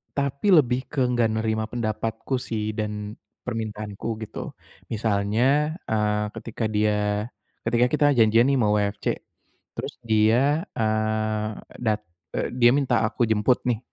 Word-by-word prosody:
tapi 140 +8 0
lebih 130 -4 +3
ke 140 -3 0
enggak 120 -2 +2
nerima 110 0 0
pendapatku 115 +2 -2
sih 110 -3 -3
dan 105 0 -4 0.3
permintaanku, 110 -1 -4
gitu. - - -7 0.4
Misalnya, 115 +8 +1
eee, 105 -1 +1
ketika 115 0 -4
dia 105 -1 +1 0.4
ketika 120 +2 +3
kita 150 -1 +3
janjian 115 +2 +5
nih - - +3
sama 110 - +3
WFC, 100 -1 -1 0.7
terus - - -5
dia, 115 +8 +3
eee, 110 -1 0 0.3
dat 110 -2 +1 0.4
eee, - - -1
dia 120 -1 +6
minta 130 -5 +2
aku 120 - -1
jemput 110 +3 +2
nih. 115 -3 +1
110 Hz, 130 wpm, -25 LUFS, 105-125 Hz, 0.7 s, dia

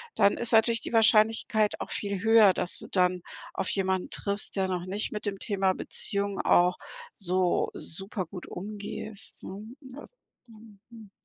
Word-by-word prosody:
dann 200 - +3
ist 235 0 +1
natürlich 230 +1 +3
die - - -5
Wahrscheinlichkeit 220 -1 +3
auch - - -6
viel 200 -2 -3
höher, 220 -3 +5
dass 175 - +1
du - - -8
dann 180 -1 +1 0.3
auf 190 - -2
jemanden 190 -1 -1
triffst, 200 0 0
der 190 -1 0
noch 180 -1 -3
nicht 200 +3 -2
mit 210 - -5
dem 195 -2 -4
Thema 195 -3 0
Beziehung 200 +1 +1
auch 180 +1 +3 0.4
so 185 -2 0
super 195 +3 -4
gut 180 +2 -10
umgehst, 205 +2 -5
ne? 215 +5 -9 0.2
Als 395 +11 -12 0.3
mhm, 220 -3 -17
mhm. 225 -4 -14
200 Hz, 160 wpm, -27 LUFS, 185-220 Hz, 0.4 s, höher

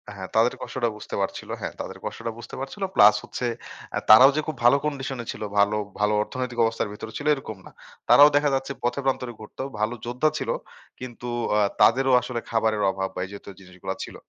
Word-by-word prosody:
হ্যাঁ, 95 -1 -7
তাদের 115 +2 +4
কষ্টটা 120 -3 -2
বুঝতে 105 - -7
পারছিল। 95 - -4
হ্যাঁ। - - -4
তাদের - - -7
কষ্টটা 115 - -4
বুঝতে 120 - -9
পারছিল 140 +9 -6
প্লাস 105 +1 +7
হচ্ছে 125 - -5 0.5
আ - - +1
তারাও 130 +6 +9
যে - - +2
খুব 155 - -3
ভালো 140 +4 +7
কন্ডিশন 135 -3 -3
ছিল - - -10 0.2
ভালো, 105 +1 +3 0.2
ভালো, 105 0 +2
অর্থনৈতিক 125 -1 -5
অবস্থার 115 -2 -1
ভেতরে 110 +1 -8
ছিল 145 - -5
এরকম 110 -7 -8
না। - - -13 0.4
তারাও 145 +1 +9
দেখা 145 0 +3
যাচ্ছে 135 +1 -3
পথে 120 +3 0
প্রান্তরে 125 -2 -1
ঘুরত। 110 - -13 0.2
ভালো 110 +3 0
যোদ্ধা 125 +6 +1
ছিল। - - -4 0.5
কিন্তু 125 -1 -8 0.3
আ - - +4 0.2
তাদেরও 130 +4 +5
আসলে 125 0 -4
খাবারের 110 -2 +1
অভাব 95 0 -3
বা - - -4
এই 95 - -12
যেহেতু 100 0 -10
জিনিসগুলা 95 0 -7
ছিল। - - -9
120 Hz, 195 wpm, -24 LUFS, 105-135 Hz, 0.5 s, তারাও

